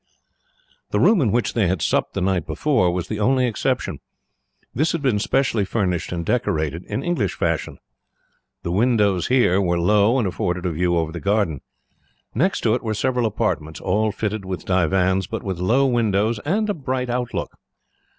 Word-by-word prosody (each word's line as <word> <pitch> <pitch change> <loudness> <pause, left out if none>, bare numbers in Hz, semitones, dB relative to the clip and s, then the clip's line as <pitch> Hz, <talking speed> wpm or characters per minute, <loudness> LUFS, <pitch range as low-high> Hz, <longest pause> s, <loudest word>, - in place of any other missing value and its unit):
The - - 0
room 220 -7 +5
in 115 -7 +2
which 120 +2 0
they 110 -5 +2
had 90 0 0
supped - - 0
the - - -1
night 90 -4 0
before 90 - +1
was 90 0 -3
the 110 0 -4
only 130 +4 +3
exception. 115 -4 -1 0.7
This 155 +7 +1
had 165 -3 -3
been 120 -6 +2
specially 120 -1 +1
furnished 95 -4 -1
and 85 -1 -3
decorated, 80 - -1
in 135 - -4
English 165 - -1
fashion. - - -2 0.9
The 85 - -3
windows 105 -3 +2
here 120 -7 +3
were 85 -2 +1
low, 105 +6 +3
and 115 -6 +1
afforded 90 -1 -2
a 90 - 0
view 85 +2 +1
over 80 -1 -1
the 85 - -6
garden. 100 -8 0 0.7
Next 180 - +1
to 110 - +2
it 125 - 0
were 110 -2 -2
several 125 +1 +1
apartments, 100 -8 -2
all 105 +3 0
fitted 105 0 -3
with 95 -3 -5
divans, 95 +1 +1
but - - -5
with 95 -4 -4
low 120 +10 +3
windows 110 -3 +1
and 210 +8 +1
a 205 - 0
bright 130 -5 -3
outlook. 125 0 -3
105 Hz, 180 wpm, -22 LUFS, 90-125 Hz, 0.9 s, room